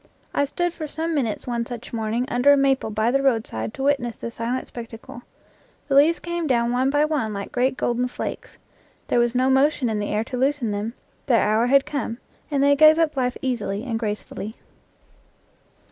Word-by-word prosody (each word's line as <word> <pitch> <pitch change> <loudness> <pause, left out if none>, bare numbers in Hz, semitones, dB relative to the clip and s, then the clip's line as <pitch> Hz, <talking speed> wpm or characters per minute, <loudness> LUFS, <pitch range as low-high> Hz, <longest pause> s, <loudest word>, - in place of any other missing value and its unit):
I 285 - +2
stood 350 +4 -2
for 310 -3 -6
some 325 +3 -3
minutes 245 -8 -1
one 235 -1 -1
such 240 0 -8
morning 225 +2 -1
under 245 +4 +4
a 285 - +6
maple 270 -4 +2
by 220 +2 +1
the 275 +1 +2
roadside 220 - 0
to - - -4
witness 270 -5 0
the 235 - -6
silent 235 +3 -3
spectacle. 235 0 -9 0.7
The 280 - -1
leaves 300 +5 +5
came 345 -1 -3
down 235 -3 +2
one 255 +2 +2
by 290 +2 +3
one 265 -9 -1
like 200 0 -5
great 255 +1 +1
golden 245 +1 0
flakes; 250 - -6 0.5
there - - +3
was 240 0 +1
no 255 +1 +3
motion 265 -2 +2
in 215 - -1
the 205 - -3
air 210 +1 0
to 250 - -6
loosen 265 -3 0
them; 210 +4 -3 0.3
their 240 -4 +4
hour 215 +3 +2
had 275 +2 +4
come, 245 -5 -3 0.3
and 280 -2 +1
they 285 0 +5
gave 310 +2 +7
up 325 -3 +1
life 250 -1 -1
easily 220 -5 -2
and 230 -4 -2
gracefully. 215 0 -5
250 Hz, 195 wpm, -23 LUFS, 230-280 Hz, 0.7 s, gave